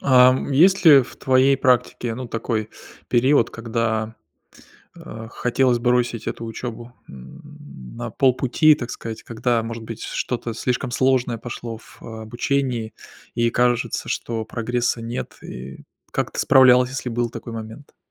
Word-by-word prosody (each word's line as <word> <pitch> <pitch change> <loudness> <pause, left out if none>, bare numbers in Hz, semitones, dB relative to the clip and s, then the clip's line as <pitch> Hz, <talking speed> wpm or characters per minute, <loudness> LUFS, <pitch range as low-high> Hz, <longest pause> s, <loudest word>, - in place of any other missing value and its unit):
Ам, 130 0 +4
есть 185 +8 +4
ли 145 -4 +9
в 125 - -12
твоей 130 +1 +3
практике, 125 -2 +1
ну, 125 +2 -6
такой 110 -1 -3 0.4
период, 130 0 +3
когда, 115 -1 -2 0.8
а, 110 0 -9
хотелось 125 0 +1
бросить 120 -1 0
эту 115 - -4
учёбу, 120 +1 -7 0.2
м, 145 - -12
на 120 0 -5
полпути, 135 +5 +3
так 120 -4 -6
сказать, 115 -1 -7
когда, 115 0 -1
может 115 0 -6
быть, 115 0 -8
что-то 120 -2 -3
слишком 125 +2 -2
сложное 125 -2 +1
пошло 115 0 -7
в - - -18
обучении 115 +1 -2 0.4
и 120 0 +1
кажется, 120 0 0
что 115 -1 -3
прогресса 120 +1 -2
нет, 115 +2 -5
и 65 +2 -9 0.3
как - - -2
ты - - -6
справлялась, 125 -1 +6
если 130 -1 -4
был 120 0 -1
такой 115 0 -8
момент? 110 +5 -9
120 Hz, 140 wpm, -22 LUFS, 115-130 Hz, 0.8 s, ли